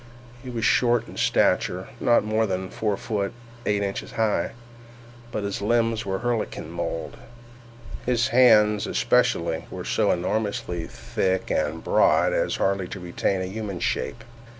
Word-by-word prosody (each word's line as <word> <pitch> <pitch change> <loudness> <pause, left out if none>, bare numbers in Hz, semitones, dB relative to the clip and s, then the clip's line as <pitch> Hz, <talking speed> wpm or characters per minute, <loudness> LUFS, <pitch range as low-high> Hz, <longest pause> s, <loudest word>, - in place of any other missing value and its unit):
He 130 - -8
was 115 -3 -2
short 120 -1 +3
in - - -11
stature, - - +1
not 120 -3 +4
more 110 +1 +1
than 95 -1 -3
four 105 -3 -1
feet 100 -2 -2 0.3
eight 105 -1 +1
inches 100 -1 -4
high, 110 -2 0 0.8
but 105 - -3
his 100 0 -3
limbs 115 0 +1
were 95 - -1
of 95 - -5
Herculean 115 -9 -2
mould. 85 -1 -4 0.9
His 120 0 +2
hands, 110 -4 +5
especially, 80 -1 +1
were - - -7
so - - +1
enormously 90 -2 -1
thick 95 -1 -2
and - - -1
broad - - +3
as - - 0
hardly 95 -1 0
to 95 - -7
retain 90 +2 -1
a - - -2
human 100 -1 -5
shape. 115 - -2
105 Hz, 150 wpm, -25 LUFS, 95-115 Hz, 0.9 s, hands